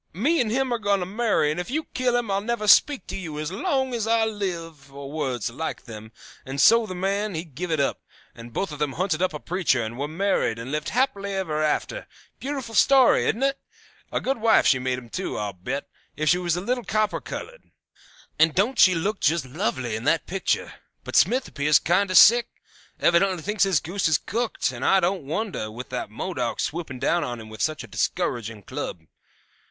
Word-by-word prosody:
Me 270 Hz, -, +2 dB
and 230 Hz, -, 0 dB
him 255 Hz, +2 st, 0 dB
are 235 Hz, -, -1 dB
going 205 Hz, -2 st, +1 dB
to 180 Hz, -, -2 dB
marry, 195 Hz, -7 st, +1 dB
and 155 Hz, -, -3 dB
if 180 Hz, -, -4 dB
you 310 Hz, +5 st, -1 dB
kill 250 Hz, -1 st, +1 dB
him 235 Hz, -4 st, -2 dB
I'll 195 Hz, 0 st, +1 dB
never 215 Hz, -1 st, -2 dB
speak 280 Hz, +6 st, +5 dB
to -, -, -6 dB
you 165 Hz, -6 st, -6 dB
as 155 Hz, +2 st, -3 dB
long 265 Hz, -, -1 dB
as 225 Hz, -2 st, -2 dB
I 225 Hz, 0 st, +3 dB
live,' 165 Hz, -9 st, -5 dB
or 140 Hz, 0 st, -9 dB
words 130 Hz, -7 st, -2 dB
like 160 Hz, +7 st, -5 dB
them, 110 Hz, -1 st, -10 dB, 0.3 s
and 135 Hz, +1 st, -6 dB
so 230 Hz, +6 st, +6 dB
the 185 Hz, -, -6 dB
man 195 Hz, +2 st, -1 dB
he 160 Hz, -, -3 dB
give 170 Hz, +2 st, -6 dB
it 160 Hz, -2 st, 0 dB
up, 140 Hz, -, 0 dB, 0.3 s
and 115 Hz, 0 st, -11 dB
both 180 Hz, +8 st, -2 dB
of 150 Hz, -, -8 dB
them 150 Hz, -3 st, -1 dB
hunted 180 Hz, -2 st, -1 dB
up 185 Hz, -, +2 dB
a 150 Hz, -, -6 dB
preacher 170 Hz, -10 st, 0 dB
and 115 Hz, +3 st, -6 dB
were 145 Hz, -, -1 dB
married 170 Hz, -, 0 dB
and 115 Hz, +3 st, -6 dB
lived 150 Hz, 0 st, -2 dB
happy 245 Hz, -4 st, 0 dB
ever 190 Hz, -6 st, -2 dB
afterward. 155 Hz, -, -1 dB, 0.3 s
Beautiful 265 Hz, -4 st, -5 dB
story, 265 Hz, +2 st, +5 dB
isn't 235 Hz, +5 st, 0 dB
it? 275 Hz, 0 st, +1 dB, 0.5 s
A -, -, 0 dB
good 270 Hz, -1 st, -1 dB
wife 225 Hz, 0 st, +4 dB
she 130 Hz, -, +4 dB
made 130 Hz, 0 st, -1 dB
him, 125 Hz, -2 st, -10 dB
too, 185 Hz, +10 st, -4 dB
I'll 105 Hz, -1 st, -3 dB
bet, 125 Hz, +10 st, -5 dB, 0.3 s
if 155 Hz, 0 st, +1 dB
she 180 Hz, -, +4 dB
was 175 Hz, -2 st, 0 dB
a 175 Hz, -, -3 dB
little 245 Hz, +5 st, -1 dB
copper 215 Hz, -1 st, 0 dB
colored. -, -, -7 dB, 0.8 s
And 160 Hz, 0 st, +4 dB
don't 220 Hz, +7 st, +1 dB
she 185 Hz, -2 st, +7 dB
look 195 Hz, +6 st, -1 dB
just 160 Hz, 0 st, +1 dB
lovely 130 Hz, -, -2 dB
in 110 Hz, -, -5 dB
that 165 Hz, -, +2 dB
picture? 195 Hz, +1 st, -1 dB, 0.3 s
But -, -, -6 dB
Smith 255 Hz, +1 st, +3 dB
appears 150 Hz, +1 st, +3 dB
kinder 185 Hz, +3 st, +1 dB
sick; 235 Hz, +5 st, +8 dB, 0.5 s
evidently 175 Hz, 0 st, +2 dB
thinks 210 Hz, 0 st, +1 dB
his 190 Hz, -6 st, +2 dB
goose 175 Hz, +6 st, -1 dB
is 155 Hz, -2 st, +3 dB
cooked; 230 Hz, -, -2 dB
and 125 Hz, 0 st, -7 dB
I 195 Hz, -, +5 dB
don't 185 Hz, -3 st, -1 dB
wonder, 165 Hz, -, -3 dB
with 120 Hz, +4 st, -8 dB
that 125 Hz, -4 st, -4 dB
Modoc 125 Hz, -, -3 dB
swooping 155 Hz, -5 st, -3 dB
down 165 Hz, +7 st, +1 dB
on 120 Hz, -1 st, -4 dB
him 110 Hz, -1 st, -10 dB
with 110 Hz, -, -8 dB
such 155 Hz, 0 st, -1 dB
a -, -, -10 dB
discouraging 115 Hz, -, -2 dB
club. 85 Hz, -, -5 dB
180 Hz, 215 wpm, -24 LUFS, 140-215 Hz, 0.8 s, sick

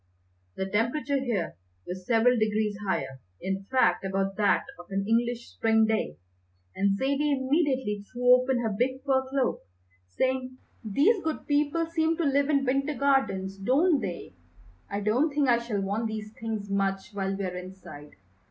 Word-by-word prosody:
The 190 Hz, -, -2 dB
temperature 240 Hz, +8 st, 0 dB
here 225 Hz, -, -2 dB, 0.3 s
was 180 Hz, 0 st, -7 dB
several 235 Hz, +1 st, +4 dB
degrees 215 Hz, -2 st, 0 dB
higher, 130 Hz, -8 st, -2 dB, 0.2 s
in 195 Hz, +1 st, -3 dB
fact 195 Hz, -8 st, +2 dB
about 195 Hz, 0 st, -1 dB
that 205 Hz, -3 st, +3 dB, 0.2 s
of 175 Hz, -, -11 dB
an 195 Hz, 0 st, -1 dB
English 235 Hz, +1 st, 0 dB
spring 225 Hz, -1 st, +3 dB
day, 215 Hz, -, -1 dB, 0.6 s
and 195 Hz, 0 st, +2 dB
Zaidie 280 Hz, +3 st, +1 dB
immediately 265 Hz, -6 st, 0 dB
threw 250 Hz, 0 st, +5 dB
open 255 Hz, 0 st, +3 dB
her 220 Hz, -3 st, -1 dB
big 260 Hz, +4 st, -1 dB
fur 265 Hz, -2 st, +3 dB
cloak, 270 Hz, -1 st, 0 dB, 0.5 s
saying: 255 Hz, -, -1 dB, 0.3 s
"These 295 Hz, -, +3 dB
good 315 Hz, -1 st, -3 dB
people 295 Hz, +3 st, +1 dB
seem 325 Hz, 0 st, 0 dB
to 340 Hz, -, 0 dB
live 280 Hz, 0 st, +2 dB
in 280 Hz, -2 st, +2 dB
Winter 275 Hz, +3 st, 0 dB
Gardens, 240 Hz, -9 st, +1 dB
don't 280 Hz, -, +3 dB
they? 175 Hz, -, -5 dB, 0.6 s
I 200 Hz, +1 st, -3 dB
don't 235 Hz, +10 st, +2 dB
think 285 Hz, -1 st, +1 dB
I 240 Hz, -1 st, +4 dB
shall 230 Hz, -4 st, -3 dB
want 205 Hz, +4 st, -1 dB
these 215 Hz, -1 st, -6 dB
things 220 Hz, -2 st, -4 dB
much 195 Hz, 0 st, -1 dB
while 195 Hz, -1 st, -2 dB
we're 185 Hz, -2 st, -3 dB
inside. 180 Hz, -5 st, -10 dB
230 Hz, 160 wpm, -27 LUFS, 195-270 Hz, 0.6 s, threw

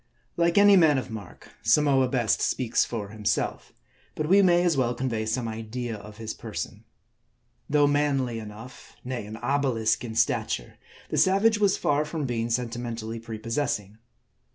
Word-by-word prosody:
Like 170 Hz, +1 st, +2 dB
any 205 Hz, 0 st, +7 dB
man 160 Hz, -6 st, +5 dB
of 130 Hz, -, -4 dB
mark, 110 Hz, -2 st, -10 dB
Samoa 135 Hz, +4 st, +3 dB
best 120 Hz, -4 st, +1 dB
speaks 120 Hz, -2 st, +1 dB
for 105 Hz, -4 st, -5 dB
himself; 105 Hz, -1 st, -2 dB, 0.4 s
but 155 Hz, -, -2 dB
we 195 Hz, +4 st, +6 dB
may 175 Hz, -2 st, +4 dB
as 175 Hz, -3 st, +2 dB
well 125 Hz, -2 st, +1 dB
convey 115 Hz, -4 st, -2 dB
some 115 Hz, +1 st, -1 dB
idea 115 Hz, +1 st, -5 dB
of 105 Hz, 0 st, -11 dB
his 110 Hz, -1 st, -5 dB
person. -, -, -7 dB, 0.8 s
Though 145 Hz, 0 st, +4 dB
manly 140 Hz, -5 st, +1 dB
enough, 110 Hz, +4 st, -11 dB
nay, 125 Hz, -4 st, -5 dB
an 110 Hz, +1 st, -7 dB
obelisk 120 Hz, -3 st, 0 dB
in 115 Hz, -2 st, -6 dB
stature, -, -, -1 dB, 0.3 s
the -, -, -1 dB
savage 205 Hz, +3 st, +4 dB
was 200 Hz, -2 st, +3 dB
far 145 Hz, +1 st, +1 dB
from 150 Hz, -1 st, -4 dB
being 120 Hz, -2 st, -2 dB
sentimentally 115 Hz, -1 st, -3 dB
prepossessing. 115 Hz, -2 st, -3 dB
125 Hz, 155 wpm, -26 LUFS, 110-145 Hz, 0.8 s, any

